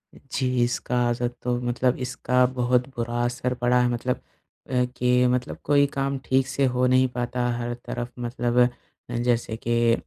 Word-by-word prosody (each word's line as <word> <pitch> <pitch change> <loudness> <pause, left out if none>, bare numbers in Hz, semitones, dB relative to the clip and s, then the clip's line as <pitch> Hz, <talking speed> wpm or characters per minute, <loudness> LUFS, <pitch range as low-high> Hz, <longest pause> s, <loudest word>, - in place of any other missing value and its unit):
जी, 125 -2 -1
इसका 120 +1 -1
असर 120 +1 0 0.2
तो 125 0 0
मतलब 125 +1 +1
इसका 125 0 +2
बहुत 125 0 +2
बुरा 120 0 -1
असर 125 +1 -1
पड़ा 125 0 +4
है 125 - +3
मतलब 120 +1 -1 0.5
अ, 125 -1 +2
कि 125 0 +3
मतलब 125 0 -1
कोई 145 -1 +4
काम 135 0 -1
ठीक 130 0 +2
से 140 - +1
हो 125 0 +1
नहीं 130 +1 +4
पाता, 120 0 -1
हर 120 0 -3
तरफ 120 0 -4
मतलब 120 0 -2 0.5
अ, 120 - -4
जैसे 120 -2 0
कि 115 0 +2
125 Hz, 165 wpm, -25 LUFS, 120-125 Hz, 0.5 s, पड़ा